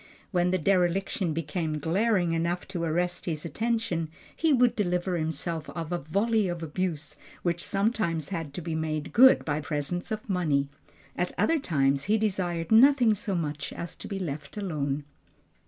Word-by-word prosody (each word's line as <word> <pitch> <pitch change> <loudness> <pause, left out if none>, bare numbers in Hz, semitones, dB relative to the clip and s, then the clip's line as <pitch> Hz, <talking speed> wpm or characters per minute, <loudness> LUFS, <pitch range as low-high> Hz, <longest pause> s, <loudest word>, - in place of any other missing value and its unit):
When 180 -2 +2
the 185 - +2
dereliction 185 +1 +1
became 155 0 -2
glaring 175 +2 +1
enough 170 +2 -1
to 180 -3 -3
arrest 175 +2 -1
his 155 -1 -2
attention, 220 -5 -1 0.3
he 320 -1 +2
would 250 -3 +4
deliver 180 -2 0
himself 160 0 -3
of 165 -1 -5
a 175 - 0
volley 205 +7 +1
of 175 -2 -4
abuse 160 -2 -3 0.3
which 175 -1 -1
sometimes 200 - 0
had 165 -6 -4
to 175 - -5
be 165 -1 -3
made 155 -1 -2
good 260 +3 +7
by 150 0 -1
presents 155 +5 -3
of 215 -1 -4
money. 155 -8 +1 0.5
At - - -2
other 330 -1 +3
times, 140 - +1
he 215 +2 +3
desired 185 -5 -1
nothing 245 0 +6
so 205 -1 -3
much 150 -3 -3
as 170 - -6
to - - -8
be 195 - -4
left 150 -3 -5
alone. 150 -7 -2
175 Hz, 165 wpm, -28 LUFS, 155-200 Hz, 0.5 s, good